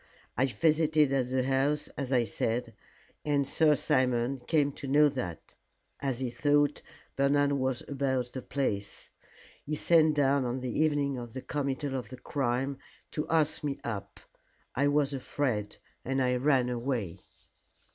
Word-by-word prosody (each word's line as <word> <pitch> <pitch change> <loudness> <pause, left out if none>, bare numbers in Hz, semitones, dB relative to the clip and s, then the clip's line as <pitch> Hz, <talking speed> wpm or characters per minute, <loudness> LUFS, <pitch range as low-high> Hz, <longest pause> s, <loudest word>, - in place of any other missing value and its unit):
"I 130 +4 +2
visited 155 0 +2
at 130 -2 +1
the 130 0 +1
house 135 +3 +1
as 140 -2 -5
I 125 -3 +4
said, 115 +1 -2 0.5
and 145 -2 +1
Sir 155 0 +4
Simon 130 -2 +1
came 150 -3 +2
to 140 - -8
know 145 +2 +5
that 95 - -6 0.5
as 135 -3 -2
he 130 -2 -2
thought 145 +2 +2 0.3
Bernard 140 +1 +3
was 130 -3 -1
about 130 -3 -1
the 130 - -4
place. 105 -8 -3 0.5
He 150 - -3
sent 155 -1 +4
down 140 -1 +3
on 125 +1 -2
the 125 -1 -3
evening 145 -3 +1
of 120 -2 -8
the 130 - -5
committal 140 -1 -2
of 130 - -4
the 130 - -9
crime 135 +1 -2 0.3
to 150 - -3
ask 155 -2 +1
me 140 -2 -2
up. 105 -4 -5 0.5
I 140 +3 +2
was 145 -1 +2
afraid, 125 -5 -2 0.3
and 135 +1 -1
I 125 -1 +2
ran 130 -2 +2
away." 120 -7 -2
135 Hz, 155 wpm, -29 LUFS, 125-145 Hz, 0.5 s, know